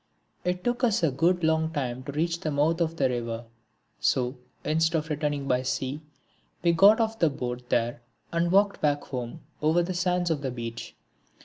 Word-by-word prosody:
It 180 0 -1
took 245 +1 -1
us 220 -7 +2
a 160 - +3
good 170 +6 +2
long 160 0 +2
time 130 -5 -3
to 140 - -4
reach 165 +3 0
the 165 - -2
mouth 155 +4 +1
of 165 0 0
the 135 - +3
river, 120 -2 -3 0.5
so, 125 0 +1 0.3
instead 160 +1 +2
of 155 0 -3
returning 145 -2 -1
by 125 -1 +2
sea, 130 +3 -2 0.6
we 170 - +5
got 200 +6 +6
off 225 0 0
the 165 - +4
boat 125 -3 -5
there 120 0 0 0.3
and 170 +1 +1
walked 200 +1 +3
back 145 -1 +1
home 125 +4 -5 0.2
over 160 +3 +3
the 185 +2 -3
sands 180 -1 +1
of 150 -3 0
the 135 - -2
beach. 120 -1 -6
155 Hz, 190 wpm, -27 LUFS, 130-170 Hz, 0.6 s, got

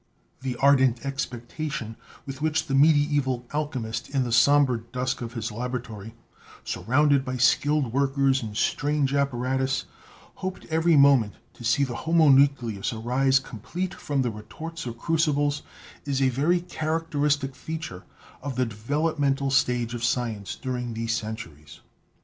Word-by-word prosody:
The 130 -1 -3
ardent 130 -2 +3
expectation 125 -2 -4 0.3
with 135 0 -7
which 155 0 +1
the 135 - -4
medieval 145 -3 +3
alchemist 130 -7 -3
in 135 -2 +1
the 120 - -3
somber 135 +1 +5
dusk 125 +3 -3
of 120 0 -5
his 115 -2 -4
laboratory, 115 -2 -5 0.5
surrounded 140 +2 +2
by 130 -1 -4
skilled 135 +2 +2
workers 135 0 +2
and 105 -2 -6
strange 145 -2 +1
apparatus, 130 -1 0 0.5
hoped 185 0 -5
every 160 0 +3
moment 135 -7 +5 0.2
to - - -13
see 115 +4 +2
the 125 -3 -2
homunculus 140 -9 +3
arise 125 +4 +2
complete 145 - -4
from 140 -2 -1
the 120 - -1
retorts 155 +9 -8
or 120 - -4
crucibles 145 +1 0 0.4
is 140 -2 -1
a 135 -1 +3
very 155 +8 +1
characteristic 150 -4 -1
feature 155 - -6 0.4
of 135 -2 -5
the 125 +1 +1
developmental 140 +4 -1
stage 125 -3 +1
of 120 -1 -5
science 115 -5 -1
during 125 -3 -4
these 115 +1 -1
centuries. 110 -10 -7
135 Hz, 135 wpm, -26 LUFS, 120-145 Hz, 0.5 s, somber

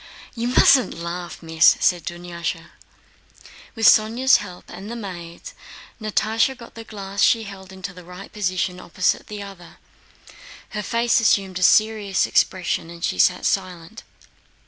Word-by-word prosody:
"You 235 0 -3
mustn't 255 +1 +4
laugh, 170 +1 -6
Miss," 160 0 +4
said 175 -2 +2
Dunyásha. 170 -1 -5 1.0
With 225 -1 -1
Sónya's 230 +6 +5
help 180 -4 -10
and 200 +2 -10
the 235 - -5
maid's, 185 - -8 0.5
Natásha 220 +4 0
got 235 -1 -13
the 225 - -9
glass 200 -2 -6
she 230 -1 +4
held 195 -2 -11
into 190 0 -8
the 180 0 -13
right 180 +3 -12
position 185 -3 -2
opposite 185 +1 -1
the 210 -1 -7
other; 195 -4 -13 0.9
her 210 - -4
face 235 +4 +1
assumed 195 -4 +1
a - - -8
serious 210 0 +3
expression 180 -2 0
and 170 0 -11
she - - -3
sat 180 0 +3
silent. 185 +1 -3
195 Hz, 145 wpm, -22 LUFS, 175-220 Hz, 1.0 s, Sónya's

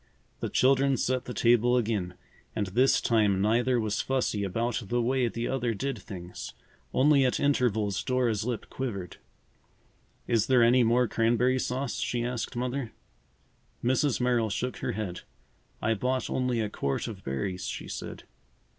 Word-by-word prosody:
The - - -3
children 135 +1 +3
set 130 +2 0
the 125 - -5
table 120 +1 +4
again 105 -6 -1 0.4
and 105 - 0
this 120 +8 +3
time 105 -5 +2
neither 120 +5 +2
was 110 -2 -1
fussy 130 -6 0
about 115 +6 -1
the 120 +4 0
way 125 +1 +1
the 115 +1 -3
other 120 -4 -1
did 135 +6 -3
things. 90 -3 -8 0.4
Only 140 - +4
at 125 - +1
intervals 110 -9 +1
Dora's 125 -5 +1
lip 120 -1 -3
quivered. 100 -9 -4 1.1
"Is 115 -4 +1
there 125 -2 +5
any 125 +2 +5
more 120 +2 +3
cranberry 120 +3 +2
sauce?" 130 +1 -2
she 120 -1 -1
asked 125 +1 -3
Mother. 125 0 -3 0.9
Mrs. 130 +2 +2
Merrill 120 -3 +2
shook 125 +5 -3
her - - -3
head. 100 -4 -4 0.6
"I 115 - +3
bought 125 +4 -1
only 125 -3 0
a 110 - 0
quart 70 - -2
of 105 -5 -8
berries," 90 +8 -3
she - - -5
said. - - -7
120 Hz, 155 wpm, -28 LUFS, 110-130 Hz, 1.1 s, there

